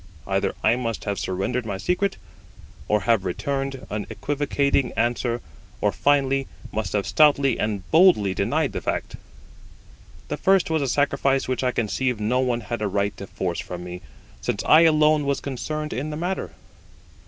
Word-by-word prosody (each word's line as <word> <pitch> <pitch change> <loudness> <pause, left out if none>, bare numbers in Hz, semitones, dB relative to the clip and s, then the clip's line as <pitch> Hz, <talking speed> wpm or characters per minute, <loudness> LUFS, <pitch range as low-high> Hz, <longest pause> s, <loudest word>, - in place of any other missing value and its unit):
Either 95 0 0
I 110 +2 +4
must 115 -3 -3
have 100 -1 -2
surrendered 95 +7 -2
my 100 -3 -4
secret, 180 - 0 0.7
or 105 0 +2
have 110 -1 +2
returned 135 +8 -3
an 105 0 -3
equivocating 140 -2 0
answer, 120 0 0 0.4
or, - - +2
finally, 135 -1 +2 0.2
must 110 0 -3
have 100 -2 0
stoutly 140 - +4
and 105 -4 -2
boldly 160 - +5
denied - - 0
the - - -4
fact. - - -3 1.1
The - - -3
first 190 -3 +3
was 160 -1 +1
a 140 - 0
sacrifice 140 0 +1
which 130 0 -1
I 130 - +2
conceive 120 +1 -1
no 115 +4 +1
one 125 -2 0
had 120 0 -5
a 105 - +1
right 100 +1 -1
to 100 - -7
force 85 -3 -3
from 90 -1 -6
me, 90 0 -7 0.4
since - - -2
I 155 - +7
alone 155 -1 +4
was 140 -1 0
concerned 150 +3 -4
in 135 +7 -3
the 150 - -4
matter. 180 +4 -3
125 Hz, 165 wpm, -24 LUFS, 105-145 Hz, 1.1 s, I